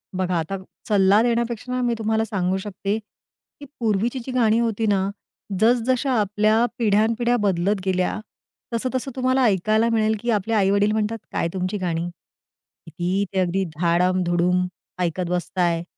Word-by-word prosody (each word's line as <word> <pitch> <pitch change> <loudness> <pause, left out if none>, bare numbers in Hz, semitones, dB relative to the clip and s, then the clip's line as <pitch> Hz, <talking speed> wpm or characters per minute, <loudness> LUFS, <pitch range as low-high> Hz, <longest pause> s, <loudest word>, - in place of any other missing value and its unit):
बघा 185 -1 0
आता 165 +5 -3 0.3
सल्ला 200 0 +4
देण्यापेक्षा 235 +1 -1
मी 240 -1 +1
तुम्हाला 220 0 +1
सांगू 190 -3 -1
शकते 200 +1 -3
की 220 +6 -19
पूर्वीची 230 +3 0
जी 260 - -5
गाणी 230 -3 +3
होती 225 -1 0
ना, 195 -1 +1 0.5
जसजशा 245 +4 +2
आपल्या 215 +3 +2
पिढ्यानपिढ्या 230 +2 +2
बदलत 195 0 +1
गेल्या 185 +1 0 0.5
तसं 230 +2 -1
तसं 260 +1 -2
तुम्हाला 255 0 +2
ऐकायला 215 +2 +2
मिळेल 220 -1 +2
की 240 - -4
आपले 215 +1 0
आई-वडील 200 0 +3
म्हणतात, 220 +1 -1
"काय - - 0
तुमची 185 +2 -2
गाणी? 170 -3 -2 0.8
किती 175 +4 -1
ते 190 - +1
अगदी 185 +1 +1
धाडम-धुडम 180 +1 +2 0.3
ऐकत 180 0 -1
बसताय. 175 -1 0
210 Hz, 140 wpm, -23 LUFS, 185-230 Hz, 0.8 s, सल्ला